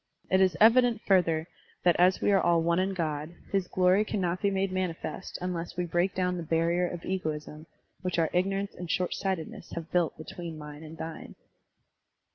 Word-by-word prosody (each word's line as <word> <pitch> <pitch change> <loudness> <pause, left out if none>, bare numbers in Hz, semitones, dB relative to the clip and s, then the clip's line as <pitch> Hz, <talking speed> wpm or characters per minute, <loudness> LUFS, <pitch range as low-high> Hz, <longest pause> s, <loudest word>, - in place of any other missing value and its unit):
It 190 0 +5
is 185 -3 +3
evident, 235 +1 +6
further, 165 -4 +3 0.4
that 175 -1 +5
as 180 +1 +4
we - - +3
are 195 - +4
all 170 -1 +3
one 170 +1 +2
in 190 +1 0
God, 155 -1 -3 0.2
his 195 -2 +1
glory 185 +3 +3
cannot 185 -4 -2
be 200 - +3
made 195 -1 0
manifest 185 0 -3
tmless 175 -1 -4
we 180 - 0
break 175 +3 0
down 180 -1 0
the - - -3
barrier 170 +2 +1
of 175 -1 -6
egoism 155 -4 -4 0.3
which 180 -2 -2
our 165 -2 +2
ignorance 195 +2 0
and 175 -1 -8
shortsightedness 185 -1 -2
have 165 -1 -6
built 175 -3 +1
between 165 +1 -7
mine 150 0 -9
and 160 0 -10
thine. 160 0 -7
180 Hz, 180 wpm, -29 LUFS, 165-190 Hz, 0.4 s, evident